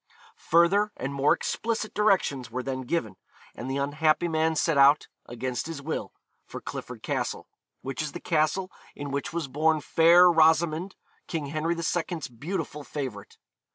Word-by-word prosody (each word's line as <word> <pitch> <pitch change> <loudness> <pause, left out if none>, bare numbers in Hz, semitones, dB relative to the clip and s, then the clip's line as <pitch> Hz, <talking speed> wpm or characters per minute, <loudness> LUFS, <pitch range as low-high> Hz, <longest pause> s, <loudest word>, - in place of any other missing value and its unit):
Further 190 +6 +4
and 135 +2 -4
more 140 +1 +2
explicit 225 -1 -3
directions 190 - +1
were 125 +2 -4
then 130 0 -3
given, 115 - -2 0.4
and 125 - -7
the 135 - -1
unhappy 155 +4 +1
man 160 0 +1
set 165 +1 +1
out, 140 +1 +5 0.2
against 125 +2 -4
his 165 -3 -5
will, 155 +3 -4 0.4
for - - -7
Clifford - - -8
Castle, - - -3 0.4
which 135 +2 -4
is 150 -2 -4
the 175 - -6
castle 170 +4 0 0.2
in 145 -1 -6
which 140 0 -3
was 165 -3 -3
born 155 +4 +2
Fair 170 +4 +6
Rosamond, 160 +2 +3 0.3
King 160 -3 -3
Henry 160 +2 0
II.'s 170 -3 -2
beautiful 150 +4 -5
favourite. 130 -9 -6
155 Hz, 155 wpm, -27 LUFS, 140-170 Hz, 0.4 s, Fair